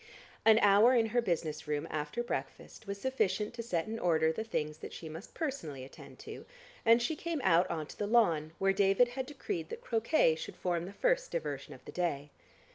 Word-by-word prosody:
An 220 -1 +7
hour 205 +5 +6
in 230 -2 +4
her 240 - +4
business 160 -6 -2
room 150 -1 -2
after 150 +10 -2
breakfast 230 -2 -6
was 200 0 -4
sufficient 215 -5 0
to 235 - -5
set 180 -7 -1
in 225 +1 -5
order 160 -4 +3
the 220 - -3
things 155 -8 -3
that - - -8
she 165 - -8
must 160 +6 -9
personally 170 - -4
attend 135 - -13
to, - - -8 0.4
and 230 +1 +6
she 240 +7 -1
came 335 0 -3
out 175 -1 +4
on 160 -2 -2
to - - -12
the 205 - -1
lawn, 170 -9 +3
where 195 0 +2
David 195 +5 +4
had 255 +1 -4
decreed 175 - -4
that - - -7
croquet 230 - +2
should 160 - -7
form 175 -2 -1
the 190 - -7
first - - +1
diversion - - -4
of - - -18
the - - -8
day. 150 -5 -2
200 Hz, 205 wpm, -32 LUFS, 160-240 Hz, 0.4 s, An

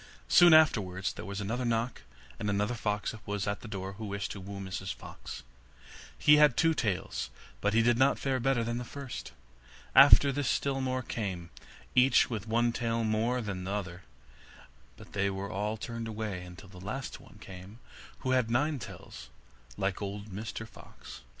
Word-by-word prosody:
Soon 175 -1 +7
afterwards 105 -11 +4
there - - -8
was 100 0 -4
another 115 +5 -2
knock, 115 0 -1 0.4
and 105 - -1
another 105 +3 0
fox 105 -2 -2
was 100 -1 -2
at 100 0 -2
the - - -9
door 95 -2 -5
who 110 +3 -7
wished 100 0 -3
to 100 - -6
woo 100 +1 -7
Mrs 95 0 -4
Fox. - - -9 0.7
He 150 0 +6
had 150 -5 +5
two 165 0 +4
tails, 105 - -2 0.3
but 100 +1 +1
he 115 - +5
did 120 0 +3
not 135 +1 +4
fare 135 -2 -1
better 125 -1 +1
than 120 +1 -2
the - - -4
first. 135 0 -7 0.6
After 140 - +8
this 140 -1 -1
still 135 -1 0
more 130 -1 -1
came, 95 -8 -4 0.4
each 125 0 +5
with 110 -2 -4
one 120 +2 +2
tail 115 -1 -1
more 115 +3 +1
than 100 -4 -4
the 95 +2 -3
other, 90 -3 -4 1.0
but - - -14
they 100 0 +1
were 100 +1 -4
all 105 +2 -2
turned 115 +1 -5
away, 105 -5 -4
until 90 +2 -12
at 90 - -10
last 110 +8 -5
one - - -16
came 95 +3 -11 0.4
who 130 - -1
had 125 -3 +2
nine 145 +5 +1
tails, - - -10 0.5
like 95 -1 -1
old 100 +1 -5
Mr 110 +3 -5
Fox. - - -13
110 Hz, 180 wpm, -30 LUFS, 100-125 Hz, 1.0 s, After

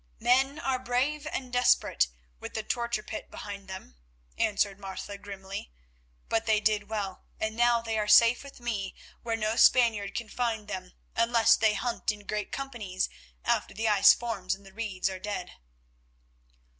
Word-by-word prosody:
"Men 270 +4 +3
are 265 -5 -1
brave 270 +5 -1
and 255 -2 -4
desperate 245 - +3 0.3
with - - -8
the 220 - -2
torture 235 -1 -1
pit 215 - -7
behind 200 -1 -8
them," 190 - -9 0.4
answered 200 - +1
Martha 195 +1 -6
grimly; 195 - -7 0.6
"but 225 0 0
they 215 -1 +4
did 210 -1 +1
well, 200 -4 -4
and 220 0 -2
now 240 0 +4
they 225 -1 -1
are 210 - -1
safe 230 +4 +6
with 280 -2 -12
me 215 -6 -3 0.3
where 230 -1 -1
no 215 0 0
Spaniard 225 -6 +4
can 235 - -3
find 225 -2 -2
them 185 -3 -6 0.2
unless 230 0 +5
they 215 -1 +3
hunt 240 -3 -1
in 210 -1 -11
great 210 -1 -3
companies 225 -9 -3 0.4
after - - 0
the 225 +2 0
ice 205 -2 +8
forms 200 -6 -1
and 195 +1 -19
the 195 - -14
reeds 205 -4 -2
are 190 -1 -4
dead." 185 -2 -4
215 Hz, 165 wpm, -29 LUFS, 200-235 Hz, 0.6 s, ice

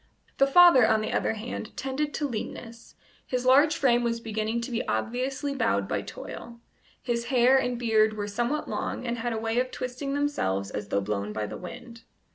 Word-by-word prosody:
The 275 - +5
father, 275 -6 +7
on 220 -1 +3
the 215 - -3
other - - +1
hand, 220 0 -7
tended 275 +3 -2
to 295 - -1
leanness; 230 -1 -7 0.3
his 250 -1 -3
large 285 +4 +5
frame 240 -3 +3
was 230 -1 -1
beginning 220 0 -2
to 235 - -5
be 235 - -1
obviously 255 - -2
bowed 100 - 0
by - - -1
toil; 235 0 -9 0.4
his 235 -1 -1
hair 255 0 +4
and 245 -2 -1
beard 220 -2 +3
were 205 0 -3
somewhat 240 +8 -2
long, - - -3
and 235 -1 -2
had 240 +1 -2
a 225 - -2
way 225 +2 0
of 255 0 0
twisting 255 +3 -4
themselves 100 - -1
as 105 0 -5
though 100 - 0
blown 100 +1 -3
by 105 0 -2
the - - -7
wind. 235 +5 -9
235 Hz, 195 wpm, -27 LUFS, 220-260 Hz, 0.4 s, father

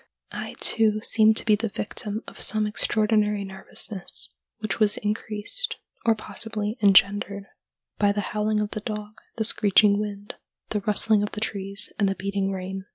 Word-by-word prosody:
I, - - -6
too, 215 -1 +3
seemed 220 0 +4
to - - 0
be 215 -2 +5
the 225 +1 -2
victim 210 +1 -5
of - - -10
some 215 -1 +4
extraordinary 210 -1 +1
nervousness, 190 0 -6 0.2
which 215 -3 -3
was 210 -1 +3
increased, 215 - -3 0.3
or 225 - +5
possibly 215 -1 -3
engendered, 200 0 +4 0.5
by 205 -1 +4
the 205 0 -1
howling 210 0 +1
of 210 - -3
the 215 - -4
dog, 210 -1 -5 0.3
the 220 - +1
screeching 205 -1 +4
wind, 205 -1 -5 0.4
the 210 - -1
rustling 210 +1 +2
of 205 - -3
the 210 - -4
trees, 200 -2 -4
and 200 -2 +3
the 195 - -1
beating 195 0 -2
rain. 190 0 -5
210 Hz, 160 wpm, -25 LUFS, 200-215 Hz, 0.5 s, be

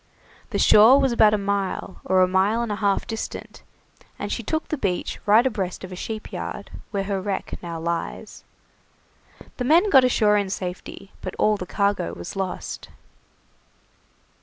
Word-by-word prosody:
The - - -2
shore 225 +6 +7
was 270 -2 +2
about 215 -2 +5
a - - 0
mile, 200 -2 -3
or 185 0 +4
a - - +3
mile 195 +5 +2
and 230 - -3
a 205 - -2
half 200 -2 +1
distant, 225 -1 -6 0.6
and - - -5
she - - -2
took 315 0 -2
the - - 0
beach 180 -6 -2
right 220 +4 +6
abreast 195 -8 -2
of 185 - -8
a - - -6
sheep 215 +4 -6
yard, - - -6 0.2
where 200 -3 -2
her 195 -1 -2
wreck 195 0 -4
now 170 -2 -6
lies. 170 +1 -4 1.1
The 250 - -2
men 340 +10 +4
got 265 -2 +7
ashore 215 -4 +3
in 200 -2 -1
safety, 190 +1 -6
but 185 - -6
all 215 0 +3
the 180 -3 -6
cargo 200 - 0
was 85 - -8
lost. 190 -2 -5
200 Hz, 170 wpm, -23 LUFS, 185-225 Hz, 1.1 s, shore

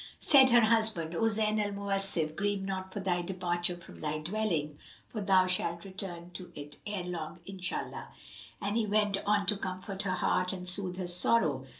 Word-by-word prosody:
Said 265 -3 +7
her 240 -1 +7
husband, 220 -7 +2
"O 225 +6 +2
Zayn 215 0 +2
al 205 0 -3
Mawasif 195 -6 0
grieve 200 +1 -1
not 190 -1 -4
for 205 - -4
thy 180 -2 0
departure 175 -1 -1
from 175 - -13
thy 155 0 -1
dwelling; 160 -4 -2 0.3
for 215 - -5
thou 190 -2 +4
shalt 170 -1 0
return 185 -3 -6
to 180 0 -9
it 145 0 -8
ere 205 -3 -3
long 170 -2 -5
Inshallah!" 185 -1 -5 0.5
And 205 +1 -2
he 225 -2 +1
went 205 -1 +2
on 205 -1 +3
to 205 +1 +1
comfort 190 0 -5
her 185 -3 -1
heart 180 0 +1
and 180 -1 -6
soothe 180 -1 +1
her 185 - -3
sorrow. 175 -6 +2
190 Hz, 185 wpm, -31 LUFS, 175-205 Hz, 0.5 s, Said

